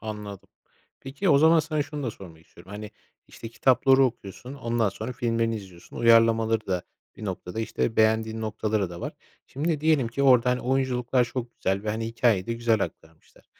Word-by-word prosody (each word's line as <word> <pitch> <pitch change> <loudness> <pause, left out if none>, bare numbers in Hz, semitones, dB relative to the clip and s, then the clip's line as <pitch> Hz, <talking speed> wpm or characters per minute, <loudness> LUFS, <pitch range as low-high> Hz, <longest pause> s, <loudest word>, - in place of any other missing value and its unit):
Anladım. 105 -3 -7 0.5
Peki, 140 +9 -3
o 140 -4 +6
zaman 160 +2 +5
sana 155 -1 -1
şunu 145 0 -7
da 120 - -2
sormak 85 -6 -14
istiyorum. 90 +2 -17
Hani, 105 0 -7 0.4
işte, 115 - -9
kitapları 130 +3 +4
okuyorsun, 125 +1 -5
ondan 115 -4 0
sonra 110 +5 -6
filmlerini 115 -2 -1
izliyorsun, 95 -4 -12
uyarlamaları 115 -1 +4
da 90 -2 -1 0.3
bir 110 - -9
noktada, 95 +1 -5
işte, 115 0 -2
beğendiğin 110 0 +2
noktaları 110 -3 -2
da 85 0 -8
var. - - -4 0.3
Şimdi 150 +2 -2
diyelim 150 -6 +2
ki 130 +4 -3
orada, 125 -2 +5
hani, 125 0 0
oyunculuklar 125 -1 +1
çok 120 0 -5
güzel 95 +1 -1
ve, 105 - -2
hani, 110 +1 -3
hikâyeyi 115 -4 +1
de 115 - -2
güzel 115 -2 +1
aktarmışlar. 80 0 -15
115 Hz, 175 wpm, -26 LUFS, 105-130 Hz, 0.5 s, o